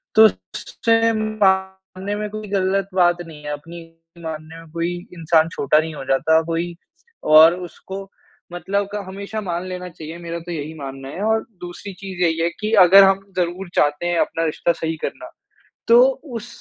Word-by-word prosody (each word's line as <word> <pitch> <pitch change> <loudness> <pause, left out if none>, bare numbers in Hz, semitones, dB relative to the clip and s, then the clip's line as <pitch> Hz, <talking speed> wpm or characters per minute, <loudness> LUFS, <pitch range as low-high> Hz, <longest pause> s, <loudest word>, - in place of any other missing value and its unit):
तो 220 - +9
उससे 225 - +1
मानने 190 -2 -1
में 210 0 -3
कोई 215 0 -7
गलत 195 0 0
बात 175 -1 +3
नहीं 150 -2 -12
है 150 - -3
अपनी 165 +4 -9 0.4
मानने 160 0 -7
में 165 - -16
कोई 170 +1 -1 0.3
इंसान 160 0 +3
छोटा 150 +2 +3
नहीं 160 0 -3
हो 135 - -7
जाता 160 +4 +3
कोई 170 +1 -2 0.6
और 165 +2 +8
उसको 195 +3 -9 0.4
मतलब 200 +3 -1
का 210 - -2
हमेशा 200 +3 -6
मान 175 -3 -3
लेना 180 0 -6
चाहिए 165 -1 -9
मेरा 170 0 -5
तो 175 +1 -9
यही 155 -1 -5
मानना 135 -1 -7
है 185 - -7
और 220 0 +1 0.2
दूसरी 180 +3 -8
चीज़ 190 -2 -7
यही 165 -1 +1
है 170 - +2
कि 215 0 -2
अगर 195 +3 +8
हम 195 0 +4 0.2
ज़रूर 175 +1 -2
चाहते 145 +3 +2
हैं 175 -1 +1
अपना 165 - 0
रिश्ता 160 +2 0
सही 160 0 -3
करना, - - -5 0.6
तो 235 +1 +7 0.3
उस 230 +1 -6
175 Hz, 175 wpm, -21 LUFS, 160-195 Hz, 0.6 s, तो